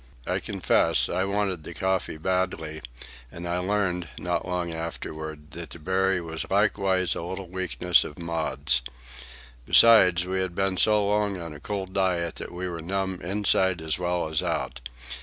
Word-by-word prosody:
I - - 0
confess, - - +2
I 95 +2 0
wanted 100 -3 -1
the - - -9
coffee 95 -4 -1
badly; 80 -3 -1 0.5
and 85 +1 -7
I 85 +1 -1
learned, 90 -2 0
not 90 0 -2
long 90 -2 -2
afterward, 80 -2 -6
that 85 -3 -6
the 65 - -9
berry 95 +3 +1
was 80 -1 -4
likewise 95 -3 +2
a - - -4
little 95 +2 -5
weakness 90 -1 +2
of 75 - -8
Maud's. 75 -6 0 0.9
Besides, 90 -7 +7
we 95 +1 -1
had 95 -2 -2
been 95 0 0
so 105 +1 +4
long 105 -2 +1
on 85 -2 -7
a 75 - -10
cold 95 +2 -4
diet 90 -4 0
that - - -6
we 90 +1 -4
were 85 -2 -5
numb 95 +1 -2
inside 95 -1 +1
as 80 +1 -2
well 90 -2 0
as 80 0 0
out. 60 - -2
90 Hz, 165 wpm, -26 LUFS, 85-95 Hz, 0.9 s, Besides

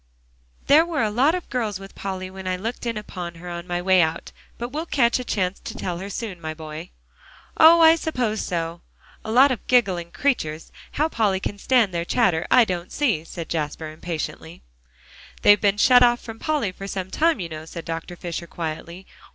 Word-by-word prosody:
"There 300 +3 +6
were 330 -6 -1
a 215 - 0
lot 270 +10 +3
of 360 - -5
girls 215 -6 -2
with 195 0 -11
Polly 185 -1 -5
when 190 0 -8
I 185 - 0
looked 230 +5 -5
in 230 -2 -2
upon 180 -5 -6
her 170 +2 -11
on 170 +1 -6
my 175 0 -2
way 185 -1 +5
out. 160 0 -2 0.3
But 240 +1 -4
we'll 310 +5 -4
catch 240 -5 +2
a - - -4
chance 190 -5 -1
to - - -8
tell 175 -2 -3
her 195 +2 -6
soon, 200 -4 -6
my 155 -1 -5
boy." 155 +2 -8 0.7
"Oh! 330 +1 +8
I 320 0 +8
suppose 250 -10 -2
so. 170 -1 -3 0.4
A 220 - -5
lot 260 +4 +6
of 245 - -4
giggling 190 -9 +2
creatures. 165 - -2 0.2
How 305 - +1
Polly 210 -10 0
can 205 +1 -5
stand 230 -5 +2
their 170 0 -1
chatter, 175 -4 +1
I 250 -2 +6
don't 180 -3 -4
see," 230 - 0
cried 170 -2 -6
Jasper 155 0 -3
impatiently. 160 0 -6 0.8
"They've 205 0 +6
been 205 -1 +2
shut 245 +3 +6
off 240 -1 +5
from 225 -1 -10
Polly 300 -11 -1
for 195 +2 -8
some 190 -1 -5
time, 325 -4 +2
you 170 -3 -4
know," 155 0 -7
said 165 +1 -8
Dr. 165 +2 -5
Fisher 170 0 -6
quietly. 170 +3 -6
195 Hz, 200 wpm, -23 LUFS, 170-245 Hz, 0.8 s, Oh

